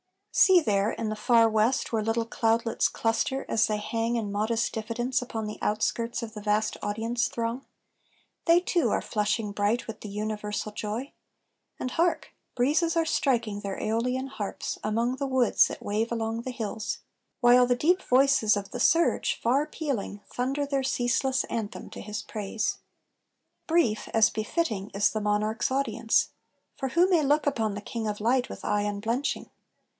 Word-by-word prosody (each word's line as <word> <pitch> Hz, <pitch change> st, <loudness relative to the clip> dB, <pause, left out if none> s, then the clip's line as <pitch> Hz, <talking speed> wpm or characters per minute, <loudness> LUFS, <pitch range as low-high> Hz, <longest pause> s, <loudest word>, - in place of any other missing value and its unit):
See 375 Hz, -2 st, +6 dB
there 205 Hz, -4 st, +1 dB
in 225 Hz, -2 st, -3 dB
the 215 Hz, -, -2 dB
far 230 Hz, +1 st, +4 dB
west, 220 Hz, +4 st, +1 dB
Where 220 Hz, -, +2 dB
little 225 Hz, +1 st, 0 dB
cloudlets 230 Hz, 0 st, +1 dB
cluster, 230 Hz, +4 st, -1 dB
as 220 Hz, -, +2 dB
they 215 Hz, -, 0 dB
hang 230 Hz, +2 st, -1 dB
In 215 Hz, -3 st, -2 dB
modest 220 Hz, +3 st, 0 dB
diffidence 240 Hz, +3 st, -1 dB
upon 225 Hz, -3 st, -4 dB
the 210 Hz, -, -6 dB
outskirts 230 Hz, +3 st, -1 dB
Of 220 Hz, -1 st, -7 dB
the 210 Hz, -, -7 dB
vast 210 Hz, +1 st, +1 dB
audience 225 Hz, +3 st, -1 dB
throng: 235 Hz, +3 st, -3 dB, 0.8 s
they 340 Hz, +1 st, +5 dB
too 350 Hz, -2 st, +1 dB
are -, -, +1 dB
flushing 210 Hz, 0 st, -1 dB
Bright 205 Hz, +4 st, 0 dB
with 225 Hz, -1 st, -7 dB
the 210 Hz, -, -7 dB
universal 210 Hz, 0 st, -3 dB
joy: 215 Hz, +6 st, -4 dB, 0.7 s
and 255 Hz, -, -3 dB
hark! 340 Hz, +4 st, 0 dB, 0.2 s
Breezes 305 Hz, +7 st, +2 dB
are 330 Hz, -1 st, +2 dB
striking 235 Hz, -9 st, 0 dB
their 200 Hz, -1 st, -5 dB
Æolian 250 Hz, +4 st, -1 dB
harps 205 Hz, -6 st, -5 dB
Among 230 Hz, +4 st, 0 dB
the 275 Hz, -, -2 dB
woods 260 Hz, -3 st, +4 dB
that -, -, -8 dB
wave 215 Hz, +3 st, -1 dB
along 225 Hz, 0 st, -2 dB
the 255 Hz, -, -4 dB
hills; 220 Hz, -3 st, -4 dB, 0.4 s
While 245 Hz, 0 st, +6 dB
the 245 Hz, -, +3 dB
deep 340 Hz, +9 st, +2 dB
voices 255 Hz, -5 st, +4 dB
of 200 Hz, -1 st, -5 dB
the -, -, -5 dB
surge, 335 Hz, +3 st, +3 dB
far 270 Hz, +6 st, +2 dB
pealing, 245 Hz, -10 st, -4 dB
Thunder 270 Hz, +4 st, -1 dB
their 275 Hz, -1 st, 0 dB
ceaseless 260 Hz, 0 st, +1 dB
anthem 220 Hz, -3 st, -5 dB
to -, -, -8 dB
his 210 Hz, +1 st, -5 dB
praise. 210 Hz, 0 st, -3 dB, 0.9 s
Brief, 315 Hz, -11 st, +2 dB
as 225 Hz, +1 st, +5 dB
befitting, 215 Hz, -, -2 dB
is 205 Hz, +1 st, +3 dB
the 215 Hz, -, -2 dB
monarch's 210 Hz, +2 st, 0 dB
audience; 235 Hz, -4 st, +1 dB, 0.5 s
For 265 Hz, -, -3 dB
who 340 Hz, +7 st, +4 dB
may 345 Hz, -4 st, +4 dB
look 295 Hz, +1 st, +2 dB
upon 225 Hz, -8 st, 0 dB
the 205 Hz, -, -5 dB
King 225 Hz, +1 st, -4 dB
of 210 Hz, -1 st, -3 dB
light 245 Hz, +3 st, +2 dB
With -, -, -8 dB
eye 210 Hz, 0 st, +1 dB
unblenching? 220 Hz, +6 st, -2 dB
230 Hz, 170 wpm, -27 LUFS, 215-260 Hz, 0.9 s, See